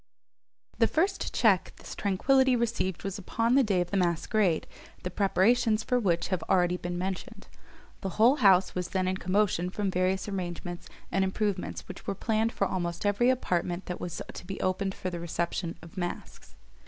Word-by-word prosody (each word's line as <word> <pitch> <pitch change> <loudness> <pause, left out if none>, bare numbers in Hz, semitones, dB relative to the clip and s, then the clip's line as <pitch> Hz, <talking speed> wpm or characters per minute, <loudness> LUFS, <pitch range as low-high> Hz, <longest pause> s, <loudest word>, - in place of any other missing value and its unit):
The - - +5
first 385 +5 0
check 200 -6 +3
this - - -9
tranquillity 260 +6 +3
received 230 -6 -1
was 195 +1 -4
upon 230 +5 0
the 275 - +6
day 200 -7 +2
of 175 - -4
the 200 - +1
masquerade, 175 0 +1 0.4
the 180 - -3
preparations 215 +4 +2
for 250 - +1
which 175 -7 0
have 185 -2 0
been - - -11
already 180 -1 +3
mentioned. 180 +1 -4 0.6
The 190 -3 -5
whole 240 +6 +6
house 190 -6 +5
was 180 -1 -2
then 185 -1 -1
in 185 0 0
commotion 185 -1 +1
from 195 +1 -2
various 185 +2 0
arrangements 175 -2 -5 0.2
and 195 - +2
improvements 190 0 -2
which - - -10
were 195 - -1
planned 220 +2 0
for 200 - 0
almost 175 -1 -3
every 205 +5 +3
apartment 180 -7 0
that 180 - -5
was 170 -1 -4
to - - -9
be 195 - -5
opened 190 +1 -1
for 185 - -4
the 175 - -4
reception 170 0 -3
of 165 - -13
masks. 175 -1 -6
190 Hz, 180 wpm, -29 LUFS, 180-215 Hz, 0.6 s, the